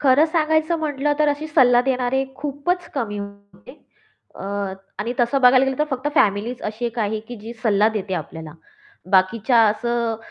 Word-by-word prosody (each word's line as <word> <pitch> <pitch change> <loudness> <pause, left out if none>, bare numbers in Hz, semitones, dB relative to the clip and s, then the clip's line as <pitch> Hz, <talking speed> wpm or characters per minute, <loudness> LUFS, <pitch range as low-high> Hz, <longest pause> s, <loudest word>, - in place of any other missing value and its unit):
खरं 280 +2 +5
सांगायचं 315 +1 +1
म्हटलं 295 -2 -1
तर 300 -1 +3
अशी 290 +2 -2
सल्ला 255 -6 +4
देणारे 260 0 0
खूपच 295 +6 -3
कमी 220 -7 -3
होते 200 +5 -12 0.5
अ, - - -10 0.6
आणि 220 +4 -2
तसं 240 +3 +1
बघायला 255 +1 +6
गेलं 265 -1 -2
तर 300 - +2
फक्त 265 +2 -2
फॅमिलीच 220 -1 +1
अशी 215 +3 -4
आहे 235 - 0
काही, 220 -2 -2
की 240 +3 -10
जी 220 +2 -9
सल्ला 210 -1 +3
देते 195 -2 -3
आपल्याला, 160 -3 -7 0.6
बाकीच्या 210 +5 +3
असं 235 +1 -1
245 Hz, 165 wpm, -21 LUFS, 215-285 Hz, 0.6 s, बघायला